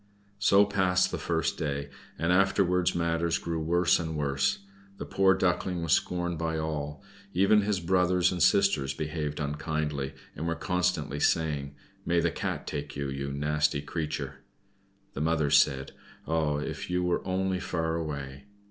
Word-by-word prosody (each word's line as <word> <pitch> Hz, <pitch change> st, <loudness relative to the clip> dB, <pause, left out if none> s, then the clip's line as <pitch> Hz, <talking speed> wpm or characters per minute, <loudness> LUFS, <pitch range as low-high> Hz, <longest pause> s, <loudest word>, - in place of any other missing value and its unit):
So 100 Hz, 0 st, +5 dB
passed 95 Hz, -2 st, +2 dB
the -, -, -3 dB
first -, -, -1 dB
day, 70 Hz, -2 st, -3 dB, 0.3 s
and 85 Hz, +2 st, +1 dB
afterwards 90 Hz, -1 st, +2 dB
matters 85 Hz, 0 st, +1 dB
grew 85 Hz, -1 st, -3 dB
worse 85 Hz, +3 st, +3 dB
and 80 Hz, -2 st, -3 dB
worse 70 Hz, +5 st, 0 dB, 0.3 s
the -, -, -5 dB
poor 95 Hz, 0 st, +3 dB
Duckling 90 Hz, -1 st, 0 dB
was 80 Hz, -3 st, +2 dB
scorned 90 Hz, -2 st, 0 dB
by 80 Hz, -1 st, -1 dB
all. 75 Hz, -2 st, -4 dB, 0.3 s
Even 100 Hz, +3 st, +5 dB
his 100 Hz, -2 st, 0 dB
brothers 90 Hz, 0 st, +2 dB
and 90 Hz, -2 st, -3 dB
sisters 75 Hz, -9 st, +3 dB
behaved 75 Hz, -1 st, -3 dB
unkindly, 75 Hz, -1 st, -2 dB, 0.2 s
and 80 Hz, +3 st, -4 dB
were 85 Hz, -, 0 dB
constantly 90 Hz, -6 st, -1 dB
saying, 75 Hz, -3 st, 0 dB, 0.3 s
"May 85 Hz, 0 st, +2 dB
the 85 Hz, 0 st, +1 dB
Cat -, -, -3 dB
take 75 Hz, -1 st, -5 dB
you, 70 Hz, 0 st, -3 dB
you 70 Hz, +1 st, -4 dB
nasty 75 Hz, 0 st, 0 dB
creature!" 75 Hz, -4 st, -4 dB, 0.8 s
The 70 Hz, -, -4 dB
mother 80 Hz, -2 st, +1 dB
said, 70 Hz, -2 st, +3 dB, 0.4 s
"Ah, 80 Hz, -2 st, +1 dB
if 75 Hz, -, -5 dB
you 90 Hz, 0 st, 0 dB
were 90 Hz, -1 st, +1 dB
only 95 Hz, 0 st, -1 dB
far 80 Hz, -3 st, -2 dB
away!" 70 Hz, -2 st, -5 dB
80 Hz, 155 wpm, -28 LUFS, 75-90 Hz, 0.8 s, So